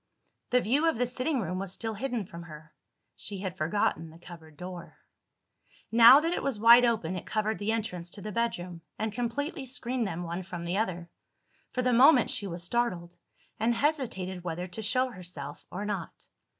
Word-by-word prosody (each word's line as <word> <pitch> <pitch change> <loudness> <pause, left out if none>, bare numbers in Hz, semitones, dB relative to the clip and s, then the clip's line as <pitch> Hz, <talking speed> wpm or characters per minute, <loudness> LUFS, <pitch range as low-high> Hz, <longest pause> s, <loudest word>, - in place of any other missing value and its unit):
The 250 0 +3
view 285 +9 +2
of 320 - -2
the 250 - +2
sitting 255 +2 -1
room 185 -1 -3
was 195 -1 -4
still 225 +1 -3
hidden 240 -1 -3
from 170 -3 -10
her. 155 -2 -12 0.4
She 200 - -5
had 190 -2 -4
forgotten 165 -1 0
the 160 - -14
cupboard 165 -3 -13
door. 180 0 -8 0.9
Now 235 +4 +9
that 330 +3 0
it - - -1
was 270 -6 -2
wide 235 +2 +8
open, 205 -7 0
it 180 - -6
covered 215 0 -1
the 205 +2 0
entrance 180 -6 -2
to 200 - -10
the 215 - -4
bedroom, 180 -6 -2 0.2
and 220 -1 -2
completely 265 +4 -3
screened 250 -2 -2
them 175 -1 -4
one 170 +2 -4
from 175 -2 -7
the 175 +3 -1
other. 175 -5 -3 0.6
For 250 - -2
the 250 0 +2
moment 255 +1 +6
she 200 - -2
was 170 -1 -5
startled, 180 -5 -1 0.4
and 230 +2 +2
hesitated 225 - -1
whether 175 0 -3
to 200 +5 -6
show 255 +5 +1
herself 175 - -9
or 200 +3 -5
not. 200 -5 -5
205 Hz, 190 wpm, -29 LUFS, 175-240 Hz, 0.9 s, Now